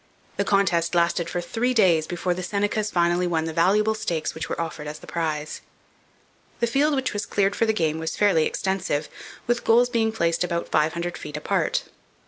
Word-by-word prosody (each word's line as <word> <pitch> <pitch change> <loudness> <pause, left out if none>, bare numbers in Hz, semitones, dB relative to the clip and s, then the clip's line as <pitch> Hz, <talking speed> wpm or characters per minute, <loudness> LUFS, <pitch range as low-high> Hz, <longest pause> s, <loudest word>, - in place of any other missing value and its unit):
The 200 - +2
contest 175 -4 +1
lasted 170 0 +1
for 175 - -2
three 245 +8 -1
days 170 -8 +4
before 175 +1 -1
the 180 - -5
Senecas 205 +3 -1
finally 175 -1 +2
won 160 -2 0
the 160 - -4
valuable 205 +6 +3
stakes 175 -8 -2
which 160 0 -5
were - - -3
offered 160 -2 -4
as 150 +1 -6
the - - -13
prize. 155 -3 -3 1.0
The 235 - +2
field 285 +5 +2
which 265 -1 -1
was 205 0 -3
cleared 200 0 +1
for 230 - +1
the - - +4
game 160 -7 0
was 160 0 -3
fairly 190 -7 +3
extensive, 190 -6 -2 0.4
the 240 - +3
goals 240 +1 +3
being 225 -2 +1
placed 170 -6 0
about 170 -1 -2
five 155 +1 +2
hundred 170 +1 -4
feet 150 0 -6
apart. 150 - 0
175 Hz, 195 wpm, -24 LUFS, 165-215 Hz, 1.0 s, days